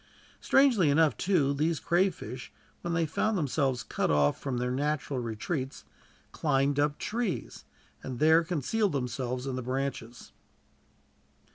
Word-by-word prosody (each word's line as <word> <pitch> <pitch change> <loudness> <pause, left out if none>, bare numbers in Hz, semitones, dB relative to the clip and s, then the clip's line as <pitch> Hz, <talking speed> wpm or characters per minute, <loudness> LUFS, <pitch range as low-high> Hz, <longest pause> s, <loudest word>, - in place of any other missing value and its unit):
Strangely 245 - +4
enough, 155 +1 +4
too, 165 -8 +2
these 155 +3 0
crayfish, 170 - -1 0.3
when 170 -1 -2
they 165 0 +2
found 210 +7 0
themselves 135 -5 0
cut - - -1
off 75 -1 +2
from 135 -3 -2
their 125 +1 -1
natural 145 0 -1
retreats, 130 +5 -4 0.5
climbed 140 +1 +1
up 145 0 +1
trees, 230 -4 -3 0.4
and 130 -2 -6
there 160 +4 +5
concealed 180 - 0
themselves 125 -1 -3
in 135 -2 -3
the 130 - -3
branches. 130 -2 -4
140 Hz, 130 wpm, -29 LUFS, 125-165 Hz, 0.5 s, there